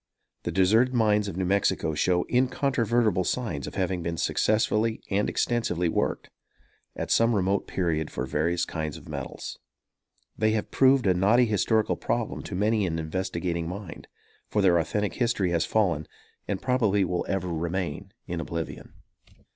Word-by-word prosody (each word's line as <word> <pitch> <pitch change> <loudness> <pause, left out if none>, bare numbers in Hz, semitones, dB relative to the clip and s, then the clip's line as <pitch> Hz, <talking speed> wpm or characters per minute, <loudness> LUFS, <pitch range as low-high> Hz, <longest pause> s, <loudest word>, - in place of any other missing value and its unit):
The - - -3
deserted 110 +7 +3
mines 105 -3 +3
of 95 -3 -5
New 95 - 0
Mexico 90 -4 +1
show 90 +4 +2
incontrovertible 120 -5 +1
signs 90 - -2
of - - -8
having 95 -2 -1
been 85 0 -3
successfully 110 +3 +1
and 100 +2 +1
extensively 115 -8 0
worked, - - -1 0.6
at - - -4
some 115 0 +4
remote 100 0 0
period, 80 -4 -1
for 60 - -3
various 85 +6 0
kinds 80 -3 -4
of - - -14
metals. - - -6 0.8
They 110 0 +2
have 110 - -2
proved 135 -2 +4
a 95 - +4
knotty 105 +7 +4
historical 110 0 +1
problem - - -2
to - - -5
many 105 +1 +1
an 80 -1 -2
investigating 85 0 -2
mind; 95 -2 -8 0.4
for 105 - +1
their 90 -3 +5
authentic 105 +5 -1
history 115 -7 0
has 85 -1 +1
fallen, 90 -9 +1 0.4
and 100 -2 -2
probably 110 -7 +2
will 90 0 -1
ever 95 -2 -1
remain 85 +2 -3
in 90 -2 -4
oblivion. 80 0 -6
95 Hz, 155 wpm, -27 LUFS, 85-110 Hz, 0.8 s, their